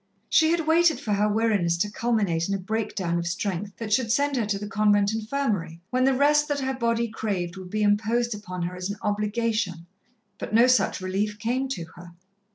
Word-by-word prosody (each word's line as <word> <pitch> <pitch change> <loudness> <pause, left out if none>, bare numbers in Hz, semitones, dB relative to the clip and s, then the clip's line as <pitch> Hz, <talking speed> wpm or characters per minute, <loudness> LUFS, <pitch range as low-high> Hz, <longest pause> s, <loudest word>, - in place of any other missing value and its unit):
She 320 0 +4
had 330 -1 +1
waited 325 0 +4
for 210 - -2
her 205 +1 +2
weariness 205 -6 +1
to 205 +4 -1
culminate 205 -8 0
in 200 - +1
a - - 0
breakdown 190 -3 -2
of 170 - -3
strength 190 +2 -3
that 220 -2 -3
should 230 -2 +2
send 280 +3 +1
her 230 -5 0
to 205 -1 0
the 205 - -6
convent 205 -1 +2
infirmary, 215 -8 -2
when 255 0 +2
the 270 0 +3
rest 295 +2 +3
that 290 -1 -1
her 265 0 -1
body 235 -2 0
craved 200 -6 -3
would 185 -1 -9
be 215 +2 -1
imposed 220 +3 +1
upon 185 -4 -6
her 180 +1 -4
as 180 +1 -4
an 205 - -4
obligation, 210 -3 -1 0.5
but - - -3
no 235 +2 +7
such 250 -6 +2
relief 200 +3 -2
came 245 +5 -1
to 260 -10 -4
her. 175 0 -12
210 Hz, 205 wpm, -25 LUFS, 190-240 Hz, 0.5 s, no